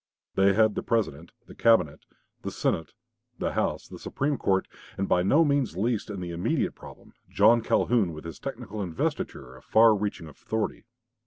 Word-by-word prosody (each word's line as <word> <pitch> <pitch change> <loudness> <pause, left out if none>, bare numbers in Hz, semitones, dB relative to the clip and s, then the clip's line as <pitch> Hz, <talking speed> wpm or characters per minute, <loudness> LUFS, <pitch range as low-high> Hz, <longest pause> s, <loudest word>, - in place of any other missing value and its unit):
They 100 0 +4
had 110 +1 +4
the - - -3
President, 85 -9 -1
the - - -13
Cabinet, 95 -10 +2 0.4
the - - -4
Senate, 80 -2 -2 0.4
the - - -2
House, - - -1
the - - -10
Supreme 145 +1 -1
Court, 95 -5 0 0.3
and, 95 - -1
by 90 - +3
no 145 - +4
means 140 - 0
least 110 +2 -1
in 100 -3 -5
the 85 -1 -5
immediate 85 +1 -1
problem, - - -14 0.2
John 120 0 +5
Calhoun 110 -4 +2
with 75 0 -9
his 85 - -8
technical 115 -6 -6
investiture 80 -7 -3
of 65 - -16
far 110 0 +5
reaching 100 -4 -3
authority. 105 +11 -4
100 Hz, 170 wpm, -27 LUFS, 85-115 Hz, 0.4 s, John